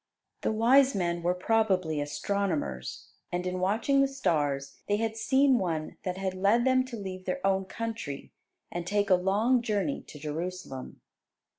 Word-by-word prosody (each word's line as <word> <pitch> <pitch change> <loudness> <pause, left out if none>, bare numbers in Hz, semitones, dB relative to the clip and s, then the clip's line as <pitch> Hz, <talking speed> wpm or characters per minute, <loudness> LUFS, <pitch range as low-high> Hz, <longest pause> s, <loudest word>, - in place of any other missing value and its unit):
The - - +1
wise 260 +5 +5
men 175 -2 0
were 175 +1 +1
probably 185 -6 +1
astronomers; 145 - -2 0.2
and 180 +1 -2
in 180 0 -2
watching 225 +9 +2
the 275 - +4
stars 145 - -1
they 205 - +2
had 220 0 -1
seen 265 +2 +3
one 160 -4 -2
that 185 0 -3
had 190 -1 -2
led 200 +6 +3
them 260 0 +4
to 250 -2 -7
leave 185 -2 -6
their 275 - -1
own 195 0 +2
country, 225 -9 -5 0.4
and 175 0 -4
take 205 0 +1
a - - +9
long 210 +7 +2
journey 220 +4 -1
to - - -10
Jerusalem. 155 -2 -5
190 Hz, 160 wpm, -29 LUFS, 175-225 Hz, 0.4 s, a